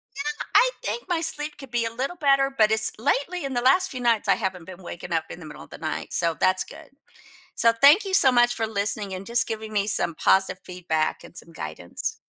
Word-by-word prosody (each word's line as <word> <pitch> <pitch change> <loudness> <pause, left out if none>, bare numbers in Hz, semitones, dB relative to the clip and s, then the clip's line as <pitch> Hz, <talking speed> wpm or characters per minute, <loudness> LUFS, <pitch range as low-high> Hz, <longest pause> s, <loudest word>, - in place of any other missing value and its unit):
Yeah! 280 - -4 0.3
I - - +6
think 475 - -3
my 340 -2 0
sleep 300 -2 -2
could 270 -3 -11
be 235 -1 0
a 225 - -3
little 270 +8 -3
better, 275 -2 +2
but 215 -3 +4
it's 220 0 +1
lately, 285 +7 -1
in 270 - -4
the 240 - 0
last 320 +10 +3
few 255 - -6
nights, 235 -3 +1
I - - +4
haven't 190 -5 -4
been 185 0 -11
waking 175 0 -7
up 160 -1 0
in - - -9
the 160 - -10
middle 150 -2 -10
of - - -17
the - - -10
night, 155 -1 -5
so 165 -2 0
that's 185 0 +2
good. 320 -2 -14 0.7
So, 230 0 +4
thank 280 - +6
you 385 - -3
so 275 -9 +6
much 240 -1 +3
for 225 -1 -2
listening 200 -1 -2
and 185 +1 -8
just 235 0 +1
giving 220 -1 -5
me 205 -1 0
some 190 -5 +1
positive 190 +3 +2
feedback 170 -4 -2
and - - -14
some 165 - -11
guidance. 80 - -6
225 Hz, 240 wpm, -24 LUFS, 185-275 Hz, 0.7 s, I